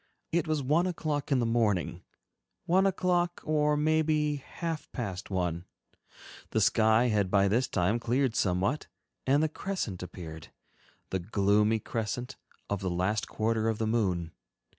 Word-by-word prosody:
It 170 0 +1
was 155 -3 0
one 155 +7 +2
o'clock 155 -5 -2
in 135 - +4
the 120 - +1
morning, 115 -6 +1 0.6
one 190 +3 +4
o'clock 180 -2 +1
or 150 -1 +2
maybe 155 -1 +2
half 165 +3 -5
past 100 -7 -5
one; 90 -2 -1 0.8
the - - +1
sky 110 +2 +4
had 105 -4 +1
by 100 0 +4
this 120 +6 +2
time 100 +5 +1
cleared 120 +1 +1
somewhat 95 +9 0 0.4
and 140 +3 +4
the - - +3
crescent 155 - -4
appeared, 80 -3 -8 0.6
the 95 - 0
gloomy 105 +3 +2
crescent 120 +4 -4 0.3
of 100 - -2
the 95 - -1
last 95 +5 0
quarter 110 0 0
of 110 - -1
the 110 - -1
moon. 95 -7 0
115 Hz, 145 wpm, -29 LUFS, 100-150 Hz, 0.8 s, in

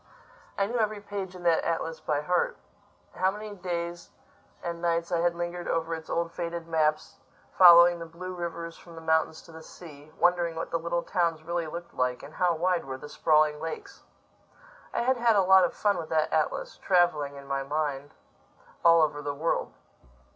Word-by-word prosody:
I 195 - +2
knew 235 +4 -2
every 215 -1 0
page 200 -2 -6
in 180 - -10
that 170 -2 +3
atlas 165 -1 -2
by 145 -1 -1
heart. 175 +4 0 0.6
How 185 - +1
many 210 +1 -7
days 175 -2 -5 0.5
and 170 -1 -4
nights 170 0 0
I 170 - +1
had 170 0 +1
lingered 175 0 -4
over 165 0 -1
its 160 -1 -7
old 170 0 -1
faded 170 -1 -5
maps, 155 -2 0 0.4
following 175 -1 +8
the 165 - -7
blue 180 +3 -8
rivers 170 -1 -5
from 170 -1 -14
the 165 - -9
mountains 160 0 0
to - - -15
the 160 0 -11
sea; 155 -2 -13
wondering 175 -1 +2
what 160 - -5
the 165 - 0
little 170 +1 -2
towns 170 -4 -1
really 170 0 -2
looked 170 +2 -8
like, 125 0 -1
and 145 +2 -11
how 180 -2 +1
wide 180 +2 0
were 130 -1 -5
the 150 - -10
sprawling 150 -1 +2
lakes! 160 0 -7 0.9
I - - -1
had 260 +1 +2
had 235 -2 +3
a 195 - +4
lot 190 0 +6
of 175 - -2
fun 205 -1 +1
with 160 - -6
that 155 -1 +1
atlas, 155 -1 -1
traveling, 175 -6 +2
in 140 0 -10
my 135 0 -2
mind, 145 0 -3 0.7
all 165 -1 +6
over 145 -1 -1
the 145 -1 -4
world. 160 - -1
170 Hz, 190 wpm, -28 LUFS, 155-175 Hz, 0.9 s, following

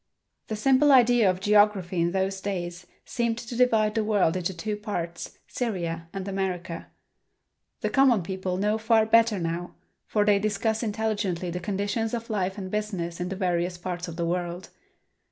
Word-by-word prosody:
The 220 - -3
simple 270 +6 +4
idea 245 -5 +6
of 185 0 0
geography 205 -3 +3
in 170 +1 +1
those 190 +1 -1
days 180 -2 -4 0.2
seemed 235 -1 -1
to 235 0 -7
divide 225 -4 +3
the 220 -1 +1
world 205 -6 +2
into 185 0 -1
two 210 +4 -3
parts, 175 -5 -5
Syria 170 -8 -3
and 195 0 -5
America. 185 -3 -3 0.9
The - - -1
common 260 -8 +4
people 185 0 -3
know 210 +3 +1
far 220 0 +3
better 225 -1 +4
now, 170 0 -3 0.3
for 210 -1 +1
they 205 -1 +4
discuss 215 +2 0
intelligently 205 -5 -1
the 180 - -3
conditions 205 +4 -2
of 230 0 -6
life 190 -1 -1
and 190 -2 -6
business 190 -6 -3
in 180 0 -2
the 195 - -3
various 175 -2 -1
parts 175 0 -4
of 170 - -7
the 170 0 -2
world. 175 +1 -3
195 Hz, 170 wpm, -26 LUFS, 180-220 Hz, 0.9 s, idea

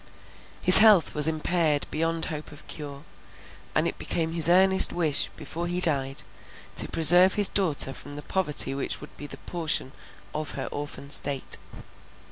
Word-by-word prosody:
His 185 - +12
health 210 -6 +3
was 150 0 +4
impaired 155 -1 -2
beyond 165 +1 -4
hope 150 -1 -8
of 150 +1 -14
cure; 145 -2 -10 0.7
and - - 0
it - - -8
became 165 -1 -4
his 165 -1 +4
earnest 190 +1 +3
wish, 160 -5 -2
before 170 +1 -7
he 175 +1 -3
died, 135 -6 -3 0.5
to - - +1
preserve 175 +4 +5
his 205 -2 +4
daughter 155 -8 +1
from 145 +1 -12
the 145 - -10
poverty 150 -7 -1
which 135 - -6
would 150 - -15
be 145 - -10
the - - -12
portion 160 -6 -4 0.4
of 155 0 -7
her - - -6
orphan 145 -1 -9
state. 140 -2 -3
155 Hz, 160 wpm, -23 LUFS, 145-175 Hz, 0.7 s, His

